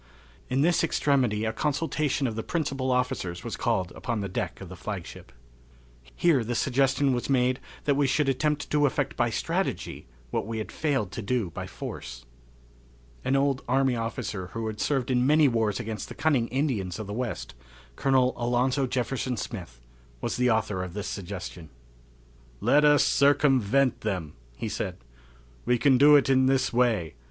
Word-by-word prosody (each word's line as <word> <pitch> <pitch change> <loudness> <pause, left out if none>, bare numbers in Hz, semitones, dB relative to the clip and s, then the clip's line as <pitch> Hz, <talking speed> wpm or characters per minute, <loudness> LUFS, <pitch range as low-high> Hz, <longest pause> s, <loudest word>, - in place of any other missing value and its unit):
In 130 +2 +1
this 170 +2 +3
extremity 130 -9 +1
a 110 - -1
consultation 145 +1 0
of 115 -4 -2
the 115 - -2
principal 135 -3 -2
officers 125 -9 -1
was - - -4
called 90 -2 0
upon 115 -3 -3
the 100 - -2
deck 90 - -4
of - - -8
the - - -9
flagship. - - -7 0.8
Here 155 -8 +3
the 120 +2 -3
suggestion 135 +2 +2
was 120 +2 -2
made 130 0 +2 0.2
that 145 - +2
we 140 0 +2
should 145 +2 +1
attempt 150 +2 0
to 145 -1 +4
effect 130 - -2
by - - +1
strategy - - -2 0.2
what - - -2
we 115 0 -3
had 110 - -5
failed 135 -11 -1
to 115 - -5
do 110 -4 -1
by - - -6
force. - - -8 1.0
An 135 - +1
old 135 -1 +1
army 130 0 +2
officer 110 -4 -4
who 115 -1 -3
had 110 -1 -4
served 135 -3 0
in 125 0 +2
many 150 0 +5
wars 110 -5 0
against 110 -2 -5
the - - -8
cunning 140 -7 +2
Indians 125 - -1
of 110 - -5
the 100 - -6
West, 110 - -4 0.4
Colonel 130 - +2
Alonzo 125 +3 +1
Jefferson 125 0 -2
Smith, 85 - -6 0.4
was - - -2
the 125 0 +2
author 110 -4 0
of 90 0 -7
this 105 0 -4
suggestion. 90 -4 -6 0.9
"Let 150 +1 +4
us 145 -1 +6
circumvent 135 -3 +3
them," 90 -8 -3 0.2
he - - -3
said. - - -3 0.7
"We 125 0 +2
can 130 0 +4
do 145 +1 +8
it 145 - +5
in 130 -1 +4
this 130 -2 +2
way. 110 - +1
125 Hz, 170 wpm, -27 LUFS, 110-140 Hz, 1.0 s, do